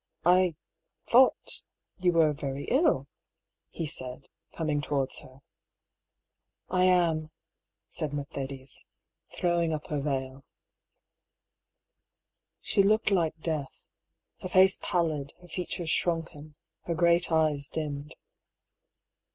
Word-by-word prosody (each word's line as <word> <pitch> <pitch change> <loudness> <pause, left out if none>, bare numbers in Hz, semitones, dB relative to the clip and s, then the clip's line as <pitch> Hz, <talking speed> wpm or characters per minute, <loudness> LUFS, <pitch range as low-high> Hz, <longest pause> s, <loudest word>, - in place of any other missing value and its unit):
" - - -48
I 180 -1 +4 0.5
thought 255 +2 +4 0.2
— - - -46
you 180 -1 +3
were 160 -2 +4
very 140 0 -4
ill," 260 - +3 0.6
he 165 - -4
said, 130 -3 -6 0.2
coming 150 -3 -1
towards 140 -2 -1
her. 130 +1 -16 0.7
" - - -58
I 185 0 +3
am," 170 -4 +3 0.6
said 155 -4 -1
Mercedes, 140 -2 -6 0.5
throwing 170 -2 +1
up 155 -1 -3
her 150 -2 -1
veil. 135 -1 -3 2.2
She - - -1
certainly 195 - +4
looked 215 0 +2
like 165 -4 +1
death: 155 -5 -1 0.7
her 185 - -5
face 190 +1 +5
pallid, 155 -5 -1
her 180 - -16
features 175 -1 -2
sunken, 160 -3 -3 0.3
her 170 - -1
great 170 +1 +3
eyes 155 -3 +2
dimmed. 150 -2 -5
155 Hz, 115 wpm, -29 LUFS, 140-175 Hz, 2.2 s, face